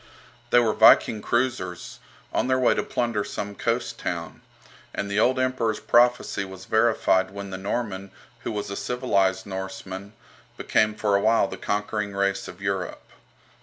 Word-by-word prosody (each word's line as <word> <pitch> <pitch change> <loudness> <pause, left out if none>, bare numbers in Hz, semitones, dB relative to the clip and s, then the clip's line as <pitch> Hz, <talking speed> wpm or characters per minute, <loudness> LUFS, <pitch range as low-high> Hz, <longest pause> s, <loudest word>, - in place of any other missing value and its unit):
They - - +4
were 115 -3 +4
Viking 110 - +6
cruisers, 120 -9 -2 0.3
on - - +1
their 130 0 +2
way 130 -2 +4
to - - 0
plunder 115 -4 -1
some 100 0 -5
coast - - -2
town; - - -4 0.5
and 100 - -3
the 100 - +1
old 130 +4 +3
Emperor's 130 -4 0
prophecy 120 -4 +3
was 95 -1 -10
verified 110 -4 +2
when 100 0 -7
the 95 - -4
Norman, 100 -1 -3 0.3
who - - -4
was 105 -2 -4
a - - -3
civilized 100 -7 0
Norseman, 95 +1 -6 0.4
became 110 0 +1
for 105 -2 +1
a 100 - +3
while 110 -1 +3
the - - -6
conquering 105 0 -2
race 100 0 0
of 90 - -10
Europe. 95 -2 -3
100 Hz, 160 wpm, -25 LUFS, 95-115 Hz, 0.5 s, Viking